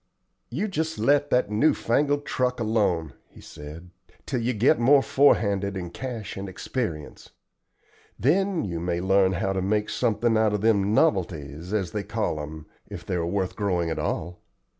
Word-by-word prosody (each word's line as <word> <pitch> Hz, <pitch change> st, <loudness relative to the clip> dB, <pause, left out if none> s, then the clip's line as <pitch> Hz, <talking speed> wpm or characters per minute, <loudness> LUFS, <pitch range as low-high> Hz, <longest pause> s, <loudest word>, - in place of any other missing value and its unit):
"You 175 Hz, -, -2 dB
jest 160 Hz, -4 st, -2 dB
let 145 Hz, +5 st, +2 dB
that 125 Hz, -4 st, +1 dB
new 115 Hz, +9 st, +3 dB
fangled 145 Hz, +4 st, 0 dB
truck 125 Hz, -1 st, -1 dB
alone," 100 Hz, -, 0 dB, 0.2 s
he -, -, -17 dB
said, 80 Hz, +4 st, -11 dB, 0.3 s
"till 125 Hz, -4 st, -2 dB
you 120 Hz, +2 st, 0 dB
get 125 Hz, +6 st, +3 dB
more 135 Hz, +3 st, +5 dB
forehanded 100 Hz, -8 st, +2 dB
in 90 Hz, -2 st, -6 dB
cash 120 Hz, -1 st, -6 dB
and 95 Hz, 0 st, -6 dB
experience. 95 Hz, -, -5 dB, 0.9 s
Then 180 Hz, -, +1 dB
you 85 Hz, -4 st, -4 dB
may 85 Hz, 0 st, -2 dB
learn 95 Hz, +1 st, +3 dB
how 95 Hz, +2 st, -1 dB
to 95 Hz, -, -1 dB
make 105 Hz, +2 st, 0 dB
something 115 Hz, +1 st, +1 dB
out 110 Hz, -1 st, +2 dB
of 105 Hz, -, -3 dB
them 105 Hz, -1 st, +2 dB
novelties, 85 Hz, -, 0 dB
as 95 Hz, -5 st, -1 dB
they 105 Hz, -, -2 dB
call 105 Hz, -6 st, -2 dB
'em, 75 Hz, +1 st, -8 dB, 0.2 s
if -, -, -9 dB
they -, -, -3 dB
are 85 Hz, -2 st, -1 dB
worth 95 Hz, 0 st, -2 dB
growing 90 Hz, -5 st, -1 dB
at -, -, -3 dB
all. 85 Hz, +2 st, -3 dB
105 Hz, 170 wpm, -25 LUFS, 90-125 Hz, 0.9 s, more